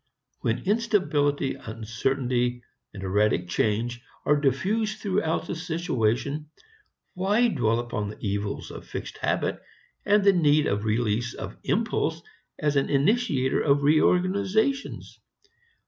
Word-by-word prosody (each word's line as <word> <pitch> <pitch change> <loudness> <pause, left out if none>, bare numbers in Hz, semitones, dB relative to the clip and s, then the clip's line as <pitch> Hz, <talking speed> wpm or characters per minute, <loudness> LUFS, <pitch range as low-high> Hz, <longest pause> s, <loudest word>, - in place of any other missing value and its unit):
When 115 - -1
instability, 185 - +1
uncertainty, 120 +2 -2 0.3
erratic 95 -1 0
change 115 +6 0 0.2
are 150 - +4
diffused 215 - 0
throughout 190 -6 -1
the - - -4
situation, 150 - -1 0.6
why 205 +6 +2
dwell 120 - +1
upon 115 -4 -3
the 105 - -9
evils 100 0 -3
of - - -10
fixed - - -6
habit - - 0 0.4
and 205 0 +3
the 200 0 +6
need 150 -4 +4
of 100 +1 -1
release 115 +1 0
of - - -7
impulse - - 0 0.3
as 150 -1 0
an 135 - +1
initiator 145 - +2
of 145 -1 +2
reorganizations? 190 - +1
140 Hz, 115 wpm, -26 LUFS, 115-185 Hz, 0.6 s, the